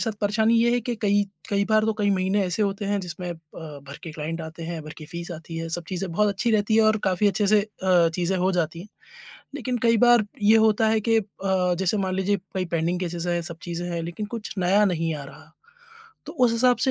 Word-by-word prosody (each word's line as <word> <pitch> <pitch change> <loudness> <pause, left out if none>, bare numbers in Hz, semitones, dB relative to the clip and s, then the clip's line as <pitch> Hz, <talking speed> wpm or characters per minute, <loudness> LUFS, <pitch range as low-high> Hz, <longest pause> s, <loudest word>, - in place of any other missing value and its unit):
साथ 225 - -1
परेशानी 220 +2 +2
ये 235 +1 +3
है 245 - +2
कि 240 +1 -3
कई-कई 200 0 0
बार 215 0 +4
तो 220 - +1
कई 205 -1 +2
महीने 190 +1 +1
ऐसे 180 +4 0
होते 200 0 -1
हैं 205 0 0
जिसमें 180 0 -6
अ, - - -4 0.2
भर 145 -3 -9
के 165 - -7
क्लाइंट 160 +2 -4
आते 160 +1 -8
हैं, 165 0 -4
भर 155 - -8
की 155 - -10
फ़ीस 170 +1 -7
आती 165 0 -8
है, 165 0 -4
सब 170 +1 -4
चीज़ें 185 -1 -3
बहुत 210 +5 +2
अच्छी 200 +4 0
रहती 215 0 +2
है 225 - +6
और 215 0 +4
काफ़ी 190 +2 +2
अच्छे 205 +1 0
से 210 +1 +5
अ, 185 -5 +2
चीज़ें 180 +2 0
हो 185 +1 +2
जाती 170 -2 -1
हैं, 195 - -11 0.7
लेकिन 255 -4 -2
कई 230 -1 +4
बार 240 -1 +5 0.2
ये 215 +2 +6
होता 220 0 +3
है 220 0 +3
कि 225 - +5
अ, - - -5 0.6
जैसे 190 +2 +1
मान 190 -2 -1
लीजिए 195 +2 +1 0.2
कई 185 -1 0
पेंडिंग 170 +2 0
केसेज़ 175 -1 -3
हैं, 175 0 0
सब 170 0 -7
चीज़ें 175 0 -4
हैं, 170 -1 -2
लेकिन 170 +5 -5
कुछ 220 -2 -6
नया 190 +3 +4
नहीं 165 -4 0
आ 145 - -6
रहा, 155 +3 -14 0.8
तो - - -7
उस 235 - +3
हिसाब 245 +2 +3
से - - +4
190 Hz, 240 wpm, -24 LUFS, 170-215 Hz, 0.8 s, है